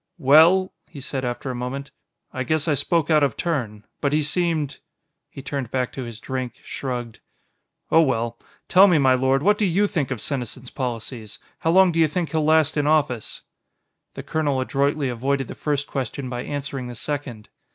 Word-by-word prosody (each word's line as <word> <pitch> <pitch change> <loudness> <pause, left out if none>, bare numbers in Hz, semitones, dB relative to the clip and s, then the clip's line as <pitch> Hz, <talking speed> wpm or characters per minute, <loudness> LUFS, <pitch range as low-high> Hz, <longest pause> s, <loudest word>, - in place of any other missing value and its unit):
"Well," 165 +6 +5 0.2
he 145 - -10
said 130 0 -4
after 125 +2 -3
a - - -5
moment, 135 +3 -5 0.4
"I 130 - -3
guess 155 +5 0
I 155 - +3
spoke 165 +2 +1
out 155 -1 +5
of 140 -6 +1
turn. 120 -11 -3
But 140 -1 0
he 155 0 +2
seemed 155 -3 -1 0.3
..." - - -55
He 135 - -10
turned 140 -4 -4
back 125 -1 -1
to 135 - -5
his 115 -2 -8
drink, 130 -1 -4
shrugged. 120 -4 -5 0.7
"Oh, 165 - +6
well. 115 -5 0 0.3
Tell 190 +2 +7
me, 175 -4 +4
my 135 -3 +4
lord, 130 +2 +2
what 205 +1 +3
do 210 - +3
you 195 +3 +2
think 165 -9 -1
of 130 -4 -3
Senesin's 125 0 -4
policies? 115 -4 -5 0.2
How 165 - 0
long 185 +1 +6
do 165 - -1
you 160 - +5
think 165 +2 -3
he'll 160 -1 +1
last 155 0 +3
in 145 0 +1
office?" 145 -7 0 0.7
The - - -6
colonel 145 -4 0
adroitly 140 +2 0
avoided 135 +2 -1
the - - -7
first 145 -1 -1
question 135 -1 -4
by 125 0 -4
answering 140 -3 -4
the 120 - -7
second. 125 -4 -5
140 Hz, 195 wpm, -23 LUFS, 125-155 Hz, 0.7 s, Tell